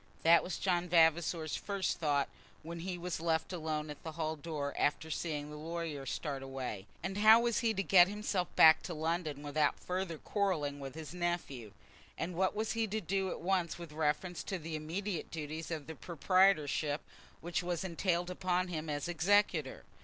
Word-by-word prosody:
That 170 +1 +7
was 180 - -4
John 180 -2 0
Vavasor's 165 -1 +3
first 200 -3 -2
thought 145 -4 +1 0.4
when 170 +2 -6
he 180 +1 -4
was 175 -2 -4
left 165 +1 0
alone 155 -3 -3
at 145 - -10
the 160 - -6
hall 160 0 -2
door, 145 -2 -4
after 160 +2 0
seeing 150 -2 -3
the 150 - -7
lawyer 160 -3 -4
start 140 +1 -3
away. 130 -7 -5 0.2
And 190 +3 -3
how 220 +2 +8
was 235 -1 +1
he 230 -2 +2
to 195 - 0
get 180 -2 +7
himself 200 -3 -1
back 160 0 +8
to 175 - -5
London 160 -2 -2
without 145 0 +1
further 180 -2 -3
quarrelling 155 -8 -1
with 135 -1 -7
his 160 +1 -7
nephew? 175 - -3 0.5
And 170 +3 -3
what 185 +3 +1
was 220 +1 -1
he 225 -1 0
to 215 +2 -2
do 195 0 -1
at - - -5
once 180 -2 0
with 170 -3 -9
reference 155 +3 -1
to 195 - -2
the 160 -1 -5
immediate 170 +4 -3
duties 160 0 -5
of 160 -4 -4 0.2
proprietorship 170 -4 +2 0.4
which 175 +2 -2
were 175 -1 -2
entailed 175 0 -1
upon 180 0 0
him 160 -2 -4
as 145 +2 -2
executor? 175 -4 +2
165 Hz, 180 wpm, -33 LUFS, 155-185 Hz, 0.5 s, how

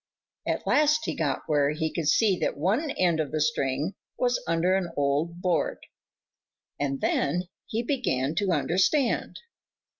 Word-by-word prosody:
At - - -1
last 300 +1 +3
he - - -1
got 145 -4 -1
where 145 -2 +2
he 160 0 -2
could 165 -4 -2
see 205 +3 +4
that - - -1
one 215 - +1
end 175 - +1
of 150 -4 -1
the 155 - -1
string 150 +2 0 0.2
was 245 -1 +1
under 165 +3 +2
an 190 -3 -1
old 150 +5 0
board, 180 -3 +1 1.0
and 140 -1 -2
then 150 +5 +1 0.2
he 225 +2 -2
began 160 - 0
to 200 -1 +1
understand. 185 - +1
170 Hz, 150 wpm, -27 LUFS, 145-200 Hz, 1.0 s, see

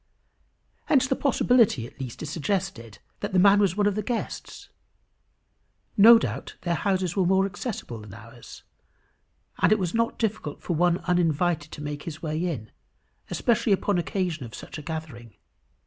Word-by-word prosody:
] - - -44
Hence 270 -4 +4
the 265 - 0
possibility 245 - +3
at - - -14
least 130 0 -6
is 155 - -5
suggested, 170 - -3 0.2
that - - -4
the - - +3
man 200 +2 +6
was 200 -2 +2
one 205 - +2
of 205 - +2
the 215 - -2
guests. 235 +2 -5 1.3
No 230 +3 +9
doubt - - -4
their 175 - -1
houses 185 -1 0
were 195 - +2
more 190 +1 +3
accessible 195 - -5
than 105 -1 -11
ours, 115 +1 -13 1.0
and - - +4
it 215 - +5
was 180 -4 -2
not 230 0 0
difficult 215 -9 -2
for 175 - -3
one 175 +1 +3
uninvited 170 -3 +1
to 150 - -7
make 145 0 -5
his 155 -1 -7
way 155 +1 -3
in, 140 -12 -4 0.6
especially 230 -3 +1
upon 195 -1 +1
occasion 175 -4 -2
of 115 - -9
such - - -8
a - - -7
gathering. 145 - -7
175 Hz, 170 wpm, -26 LUFS, 150-205 Hz, 1.3 s, No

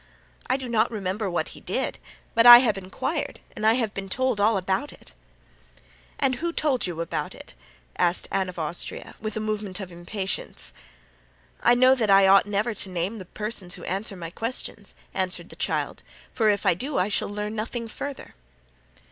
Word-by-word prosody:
"I 260 - +3
do 265 -2 -6
not 230 -1 +2
remember 205 -2 -2
what 175 - -1
he - - -10
did, - - -2 0.3
but 230 +1 +5
I 240 0 +14
have 240 -5 +3
inquired 190 -1 -3 0.2
and 215 - 0
I 220 - +7
have 230 -5 -1
been 195 -1 -5
told 255 -1 0
all 210 0 +4
about 190 +9 -1
it." - - -16 1.0
"And 260 -2 +1
who 340 +4 -2
told 285 - +1
you 170 -2 -4
about 170 - -3
it?" - - -13 0.5
asked 175 +1 +1
Anne 190 -1 0
of 180 - -9
Austria, 160 +1 -5
with 215 0 -4
a - - 0
movement 210 -3 -3
of 190 -3 -7
impatience. 190 +3 -5 0.9
"I 240 - +5
know 255 +1 +6
that 230 -5 0
I 195 0 +7
ought 195 +1 +6
never 210 +3 0
to 195 -1 -3
name 185 +5 -2
the 185 - -8
persons 210 -2 -3
who - - -11
answer 195 +3 -3
my 165 -2 -7
questions," 225 -1 -5 0.2
answered 185 -2 -2
the - - -11
child, - - -2 0.3
"for 220 -2 +3
if 205 -1 +1
I - - +5
do 265 - -3
I 180 - +2
shall 205 - 0
learn 210 +1 -4
nothing 230 +2 -3
further." 280 +5 -7
210 Hz, 190 wpm, -25 LUFS, 190-230 Hz, 1.0 s, I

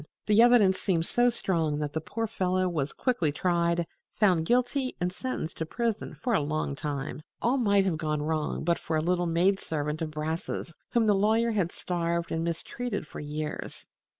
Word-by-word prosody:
The 210 +1 +5
evidence 235 -6 +6
seemed 170 -4 +1
so 240 +5 +3
strong 165 -10 0
that 150 -1 -3
the 160 - -1
poor 225 +8 -3
fellow 185 -3 0
was 155 -5 -1
quickly 210 - 0
tried, 170 +1 +1 0.3
found 180 -6 +3
guilty 250 +2 +1
and 180 0 -1
sentenced 255 -8 -4
to 160 - -2
prison 230 +2 -2
for 245 - -1
a - - +4
long 150 -1 -2
time. 145 -1 -4 0.2
All 250 +3 +2
might 200 -5 +3
have 175 -5 0
gone 155 -2 -1
wrong 155 0 -1
but 170 +1 +1
for 160 - -1
a - - +2
little 175 +1 +1
maid 180 +4 +3
servant 150 0 -3
of 160 - -1
Brass's, 160 +2 -4 0.2
whom 235 -2 +2
the 210 - +5
lawyer 220 +4 +3
had 190 -6 0
starved 170 -1 -2
and 165 0 -1
mistreated 200 +5 -3
for - - -9
years. 150 +1 -5
175 Hz, 185 wpm, -28 LUFS, 155-210 Hz, 0.3 s, evidence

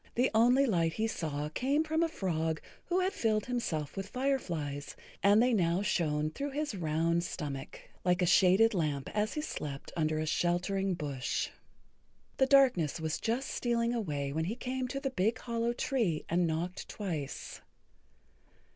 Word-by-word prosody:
The 250 +2 +2
only 245 +5 +5
light 170 -8 +1
he 220 - 0
saw 150 -8 -2
came 275 - +1
from 320 +1 0
a 335 - +2
frog 160 - -1 0.3
who 360 +1 +1
had 375 +1 0
filled 215 -2 +1
himself 175 - -2
with 195 0 -4
fireflies, 170 - -2 0.3
and 200 +2 +6
they 250 0 +3
now 180 -2 +2
shone 155 -5 0
through 285 - -3
his 295 -2 -2
round 170 -1 +1
stomach 140 -6 -5 0.2
like 180 0 +2
a - - +4
shaded 190 +6 +5
lamp 150 -7 -1
as 210 +1 0
he 300 - -1
slept 145 - -5
under 155 -1 +1
a 155 - -1
sheltering 180 +4 0
bush. 140 -5 -2 0.9
The 265 - +4
darkness 250 - +4
was 160 0 -2
just 240 +4 -1
stealing 235 -1 0
away 145 -11 -2
when 160 +1 0
he 210 +6 -2
came 255 +1 -3
to 275 +2 -3
the 275 -1 -2
big 220 +2 +1
hollow 235 0 -1
tree 235 - 0
and 175 +1 +2
knocked 170 +3 -3
twice. 165 -9 -5
190 Hz, 165 wpm, -31 LUFS, 160-245 Hz, 0.9 s, and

